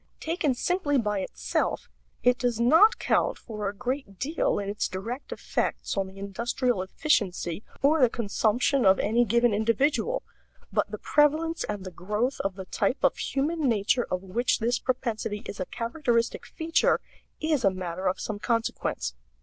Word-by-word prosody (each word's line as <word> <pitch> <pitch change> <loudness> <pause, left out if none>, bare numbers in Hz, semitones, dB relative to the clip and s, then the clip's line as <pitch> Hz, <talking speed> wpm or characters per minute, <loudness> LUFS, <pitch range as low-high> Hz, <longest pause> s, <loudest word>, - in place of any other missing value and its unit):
Taken 320 -5 0
simply 305 0 +1
by 210 -4 0
itself 190 - -2 0.4
it 250 0 +4
does 245 -3 0
not 320 - +6
count - - +1
for 210 -3 -4
a 205 - -8
great 250 -3 -4
deal 305 - 0
in 200 - -3
its 205 +1 -1
direct 225 +8 -6
effects - - -2
on 195 -1 0
the 190 +1 -13
industrial 230 +3 -1
efficiency 190 - 0 0.2
or 300 +2 +4
the 250 - +6
consumption 235 +4 +1
of 190 -1 +6
any 235 +4 +2
given 235 +1 +3
individual; 270 - +1 0.5
but - - +1
the - - -5
prevalence 310 +3 +2
and 205 -2 -5
the 185 - -6
growth 210 +9 -2
of 195 -1 -2
the 190 -1 -7
type 210 +7 -1
of - - +4
human 290 +1 0
nature 230 +2 +1
of 185 +1 -2
which 230 +7 +1
this 240 +1 0
propensity 225 -5 -2
is 200 - -7
a 185 - -2
characteristic 235 0 -1
feature 325 0 +2 0.4
is 310 -5 +1
a 195 - +6
matter 185 0 -4
of 185 - 0
some 210 -2 -4
consequence. 230 - -1
235 Hz, 165 wpm, -27 LUFS, 200-270 Hz, 0.5 s, not